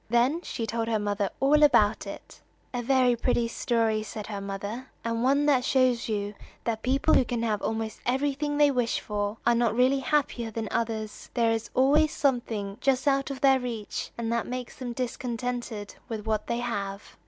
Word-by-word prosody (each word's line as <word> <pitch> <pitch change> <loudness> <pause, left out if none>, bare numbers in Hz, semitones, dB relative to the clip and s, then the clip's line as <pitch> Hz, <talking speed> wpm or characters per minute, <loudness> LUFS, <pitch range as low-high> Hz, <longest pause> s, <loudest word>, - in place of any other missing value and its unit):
Then 245 +8 +2
she 230 - -4
told 225 0 -2
her 225 -1 +1
mother 205 -1 -1
all 295 +3 +4
about 235 -7 +4
it. - - -10 0.3
"A 245 - -1
very 250 0 +3
pretty 235 0 +1
story," 230 -2 0
said 215 -1 -6
her 205 -2 -5
mother, 200 +6 -5 0.2
"and 230 0 -1
one 280 +3 +3
that 270 -4 +4
shows 255 -3 +2
you 205 -1 -2 0.3
that 225 -1 -2
people 270 +5 +2
who - - +6
can 235 -1 -2
have 215 -3 0
almost 220 0 -3
everything 285 +3 0
they 295 -1 +5
wish 245 -3 0
for, 205 0 -3
are 240 - +5
not 235 -1 +2
really 255 +3 +4
happier 255 -3 0
than 220 0 -4
others. 220 -2 -3
There 230 -2 +3
is 225 -1 -2
always 295 +4 +4
something 230 -8 -1
just 270 +1 +1
out 275 0 +2
of 275 -1 -6
their 270 -2 +5
reach, 235 -4 -4
and 230 0 -1
that 235 - -1
makes 250 0 -5
them 245 -2 -5
discontented 240 -3 -4 0.2
with 220 -2 -4
what 215 -1 -1
they 235 - -1
have." 200 -4 -4
235 Hz, 190 wpm, -27 LUFS, 220-260 Hz, 0.3 s, who